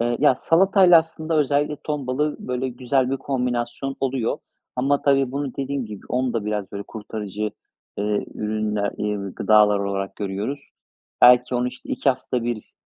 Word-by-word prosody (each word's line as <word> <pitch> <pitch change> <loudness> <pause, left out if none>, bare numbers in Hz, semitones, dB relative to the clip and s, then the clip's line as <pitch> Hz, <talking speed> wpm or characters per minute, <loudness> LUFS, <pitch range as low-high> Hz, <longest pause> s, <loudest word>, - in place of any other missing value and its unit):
Eee, 120 0 +1
ya, 145 -3 +5
salatayla 180 +3 +5
aslında 160 0 -2
özellikle 145 +1 +1
ton 150 -4 -3
balığı, 145 +4 0
böyle, 125 +1 -2
güzel 125 +1 0
bir 135 - 0
kombinasyon 125 0 -2
oluyor. 130 -3 -1 0.4
Ama 140 +3 +1
tabii 135 -2 +2
bunu 140 -2 -3
dediğim 140 -3 -2
gibi, 105 -2 -10
onu 125 0 0
da 115 -3 -2
biraz, 105 -2 -3
böyle, 100 - -4
kurtarıcı, 105 -1 -5 0.5
eee, 105 0 0
ürünler 105 -1 -1
eee, 105 -2 -2
gıdalar 105 -1 +5
olarak 100 -1 -3
görüyoruz. 105 +8 -3 0.6
Belki 125 0 +7
onu, 125 +1 +1
işte, 125 - -13
2 - - 0
haftada 125 -1 -3
1 120 -3 -4
125 Hz, 160 wpm, -23 LUFS, 105-140 Hz, 0.6 s, Belki